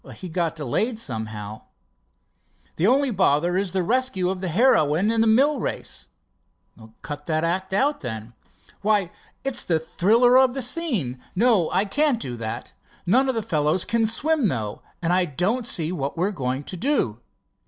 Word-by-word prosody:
"He's 180 Hz, -3 st, -8 dB
got 165 Hz, -1 st, -1 dB
delayed 165 Hz, -, -1 dB
somehow." 110 Hz, -, -5 dB, 1.2 s
"The 175 Hz, -, +2 dB
only 270 Hz, +2 st, +3 dB
bother 175 Hz, -3 st, +2 dB
is 190 Hz, -1 st, 0 dB
the 190 Hz, -1 st, 0 dB
rescue 225 Hz, -4 st, +1 dB
of 185 Hz, -1 st, -5 dB
the 190 Hz, -, -2 dB
heroine 180 Hz, -, +3 dB
in 230 Hz, -1 st, +2 dB
the 225 Hz, -, +3 dB
mill 270 Hz, +6 st, +4 dB
race." -, -, -4 dB, 1.0 s
"Cut 145 Hz, +1 st, -7 dB
that 155 Hz, -1 st, 0 dB
act 185 Hz, +3 st, -1 dB
out, 275 Hz, +9 st, +1 dB
then." 110 Hz, -2 st, -6 dB, 0.5 s
"Why, 205 Hz, -4 st, +1 dB, 0.3 s
it's 270 Hz, -2 st, -1 dB
the 165 Hz, -, +1 dB
thriller 225 Hz, +10 st, +4 dB
of 260 Hz, -1 st, +3 dB
the 270 Hz, -, -1 dB
scene. 225 Hz, -, -1 dB
No, 210 Hz, -5 st, +3 dB
I 190 Hz, +3 st, +1 dB
can't 275 Hz, +3 st, +1 dB
do 125 Hz, -, -4 dB
that. 110 Hz, -1 st, -6 dB, 0.3 s
None 260 Hz, +9 st, +3 dB
of 260 Hz, -, 0 dB
the 225 Hz, -, -1 dB
fellows 155 Hz, +2 st, 0 dB
can 230 Hz, -1 st, +1 dB
swim, 290 Hz, +3 st, +1 dB
though, 110 Hz, -, -3 dB, 0.2 s
and 170 Hz, +1 st, +2 dB
I 185 Hz, 0 st, +3 dB
don't 195 Hz, -, -1 dB
see 165 Hz, -6 st, -1 dB
what 145 Hz, -3 st, -3 dB
we 175 Hz, -, +1 dB
are 205 Hz, -, 0 dB
going 130 Hz, -5 st, -3 dB
to 185 Hz, -, -6 dB
do." 165 Hz, -, 0 dB
185 Hz, 175 wpm, -24 LUFS, 150-235 Hz, 1.2 s, mill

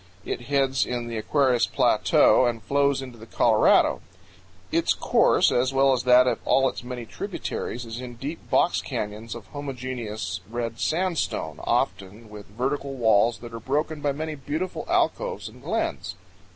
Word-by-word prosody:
It -, -, -3 dB
heads 135 Hz, -2 st, +2 dB
in 120 Hz, -1 st, -3 dB
the 115 Hz, -1 st, -5 dB
Aquarius 130 Hz, +2 st, +2 dB
Plateau -, -, +4 dB
and 115 Hz, -2 st, -3 dB
flows 140 Hz, -1 st, +1 dB
into 125 Hz, -3 st, -11 dB
the 115 Hz, -, -12 dB
Colorado. -, -, +3 dB, 0.7 s
Its -, -, +2 dB
course, -, -, +3 dB
as 130 Hz, +2 st, +1 dB
well 135 Hz, 0 st, +4 dB
as 125 Hz, -1 st, -2 dB
that 125 Hz, 0 st, +7 dB
of 125 Hz, -, 0 dB
all 135 Hz, 0 st, +3 dB
its -, -, -5 dB
many 125 Hz, -1 st, -6 dB
tributaries, 120 Hz, +2 st, -5 dB
is 115 Hz, +2 st, -7 dB
in 125 Hz, -1 st, -8 dB
deep 145 Hz, +7 st, -7 dB
box -, -, +2 dB
canyons 105 Hz, +2 st, -5 dB
of 115 Hz, -3 st, -9 dB
homogeneous 125 Hz, -8 st, -5 dB
red 115 Hz, 0 st, -4 dB
sandstone, 175 Hz, 0 st, -1 dB
often 105 Hz, +3 st, -2 dB
with 105 Hz, -1 st, -10 dB
vertical 135 Hz, +5 st, -3 dB
walls 115 Hz, -1 st, +3 dB
that 120 Hz, -1 st, -9 dB
are 115 Hz, -, -5 dB
broken 150 Hz, +5 st, -2 dB
by 145 Hz, -, +1 dB
many 155 Hz, +2 st, -4 dB
beautiful 155 Hz, +6 st, -4 dB
alcoves -, -, 0 dB
and -, -, -13 dB
glens. -, -, -3 dB
125 Hz, 160 wpm, -25 LUFS, 115-140 Hz, 0.7 s, that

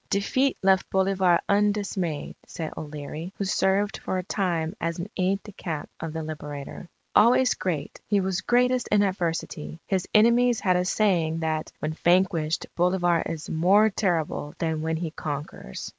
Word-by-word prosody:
"'Defeat 260 Hz, +7 st, +1 dB
left 190 Hz, 0 st, +3 dB
Bolivar 190 Hz, -2 st, +3 dB
undismayed,' 200 Hz, -6 st, 0 dB
said 160 Hz, -2 st, -5 dB
O'Leary, 150 Hz, +3 st, -6 dB
who 200 Hz, -, -2 dB
served 195 Hz, +1 st, +1 dB
for 185 Hz, -, -3 dB
a 185 Hz, -, -2 dB
time 175 Hz, -3 st, -1 dB
as 165 Hz, 0 st, -1 dB
an 175 Hz, +2 st, -4 dB
aide 190 Hz, +2 st, 0 dB
de 210 Hz, -, -10 dB
camp 160 Hz, -6 st, -5 dB
of 165 Hz, -1 st, -4 dB
the 160 Hz, 0 st, -4 dB
Liberator. 150 Hz, +1 st, -7 dB, 0.3 s
'Always 250 Hz, +3 st, +5 dB
great, 160 Hz, -6 st, -4 dB
he 205 Hz, -1 st, +2 dB
was 190 Hz, -1 st, -1 dB
greatest 250 Hz, 0 st, +2 dB
in 205 Hz, -1 st, +3 dB
adversity. 165 Hz, -4 st, -3 dB
His 190 Hz, -2 st, -1 dB
enemies 235 Hz, +2 st, +4 dB
had 185 Hz, -2 st, +3 dB
a 180 Hz, 0 st, +1 dB
saying 170 Hz, -6 st, +1 dB
that 155 Hz, -1 st, -2 dB
"when 155 Hz, +1 st, -3 dB
vanquished 170 Hz, -2 st, +2 dB
Bolivar 175 Hz, -1 st, +2 dB
is 165 Hz, -2 st, -5 dB
more 195 Hz, +7 st, +4 dB
terrible 165 Hz, -7 st, -1 dB
than 160 Hz, -2 st, -1 dB
when 160 Hz, 0 st, -1 dB
he 165 Hz, -1 st, -3 dB
conquers." 145 Hz, -2 st, -6 dB
180 Hz, 160 wpm, -26 LUFS, 160-200 Hz, 0.3 s, Always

